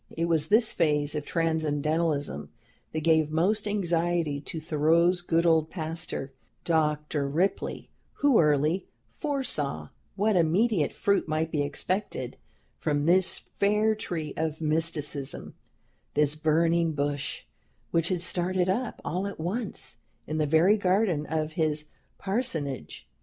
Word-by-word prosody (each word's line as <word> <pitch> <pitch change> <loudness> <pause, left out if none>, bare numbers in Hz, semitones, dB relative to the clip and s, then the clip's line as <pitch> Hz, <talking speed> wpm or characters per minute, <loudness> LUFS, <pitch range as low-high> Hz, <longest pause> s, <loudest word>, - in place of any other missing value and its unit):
It 165 - +1
was 160 -3 +2
this 220 +5 +3
phase 150 -3 +1
of 150 -1 -4
Transcendentalism 155 - 0 0.4
that 155 - -2
gave 160 -1 +3
most 195 +7 +1
anxiety 170 -6 0
to 160 +2 -6
Thoreau's 165 +3 +2
good 170 -1 +1
old 160 -2 +3
pastor, 160 -5 -4 0.3
Dr. 150 -3 0
Ripley, 180 +7 -1 0.2
who 285 -5 +3
early 150 +3 +2 0.2
foresaw 155 - -2 0.3
what 210 +1 +2
immediate 175 +2 +2
fruit 200 -3 +1
might 155 +1 -1
be 150 - 0
expected 185 +7 -3 0.4
from 145 -2 0
this 185 +2 +3
fair 210 +2 +1
tree 165 -8 -4
of 160 -1 -2
mysticism, 155 -3 -1 0.6
this 150 -1 +3
"burning 165 +1 +2
bush" 145 -1 -2 0.5
which 165 0 +1
had 180 -2 -1
started 180 +1 0
up, 230 +5 -2
all 185 +5 -1
at 200 - -7
once, 180 - -4 0.3
in 155 +1 -3
the 150 - +2
very 165 +8 +5
garden 185 -5 +1
of 155 -1 -1
his 155 -1 -1 0.3
parsonage. 180 - -3
160 Hz, 125 wpm, -27 LUFS, 150-185 Hz, 0.6 s, very